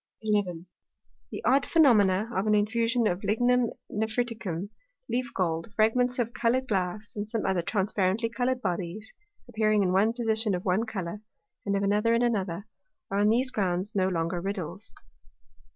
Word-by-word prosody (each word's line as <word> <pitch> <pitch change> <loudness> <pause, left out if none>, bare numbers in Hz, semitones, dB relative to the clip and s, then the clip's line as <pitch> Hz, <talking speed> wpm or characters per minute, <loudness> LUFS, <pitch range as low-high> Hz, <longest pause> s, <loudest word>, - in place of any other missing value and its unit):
11. 195 -6 0 0.7
The - - -6
odd 275 +2 +4
Phænomena 220 - +4
of 190 +3 0
an 210 - +4
infusion 230 +3 +1
of 180 -2 0
Lignum 245 +3 +2 0.2
Nephriticum, 220 -4 -2 0.4
Leaf 245 -1 -2
gold, 165 0 -1
Fragments 245 +3 +2
of 235 -1 -1
colour'd 255 +1 +1
Glass, 195 0 -2
and 205 0 -4
some 220 -1 -2
other 185 -2 +1
transparently 195 +3 0
coloured 250 +2 -1
Bodies, 185 +3 -3 0.3
appearing 215 -3 +2
in 180 - +1
one 205 +4 +3
Position 220 -3 +1
of 180 - -6
one 200 +5 +1
Colour, 200 -1 -5 0.5
and 200 0 +1
of 200 - -1
another 210 +3 +2
in 235 - +2
another, 200 -5 -1 0.5
are 200 - 0
on 205 +1 +4
these 255 +4 +2
grounds 190 -3 -1
no 185 -2 +2
longer 170 -1 -1
Riddles. 195 0 -5
210 Hz, 155 wpm, -27 LUFS, 190-230 Hz, 0.7 s, odd